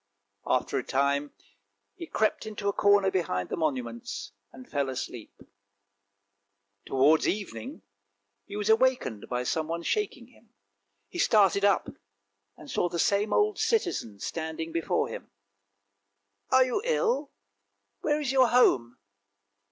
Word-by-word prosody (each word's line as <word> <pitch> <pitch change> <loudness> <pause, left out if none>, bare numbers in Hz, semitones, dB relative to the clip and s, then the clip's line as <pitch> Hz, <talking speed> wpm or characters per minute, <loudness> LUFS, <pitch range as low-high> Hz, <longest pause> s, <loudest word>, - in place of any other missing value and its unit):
After - - +1
a - - -5
time 140 +1 0 0.6
he 335 - -9
crept 220 -3 0
into 210 -1 -5
a 200 - +2
corner 200 -1 +4
behind 90 - -1
the - - -2
monuments 125 -7 -3 0.2
and 130 -1 -13
fell 140 -2 -1
asleep. 125 -3 -7 1.4
Towards 145 +4 +4
evening 115 - -4 0.6
he 200 - -9
was 210 0 -2
awakened 220 - +2
by 125 0 -1
someone 165 +5 -2
shaking 295 - -2
him. 235 -3 -25 0.5
He - - -8
started 200 -2 +4
up, 200 -1 +3 0.7
and 150 - -13
saw 175 - 0
the 170 - -4
same 200 +5 +1
old 425 0 +2
citizen 360 - 0
standing 160 +5 -4
before 165 -1 0
him. - - -8 0.6
" 100 0 -51
Are 260 0 +6
you 255 +9 -1
ill? 485 0 0 0.7
Where 300 -1 0
is 285 -4 -1
your 260 -2 +5
home? 125 - +3
170 Hz, 130 wpm, -28 LUFS, -, 1.4 s, Are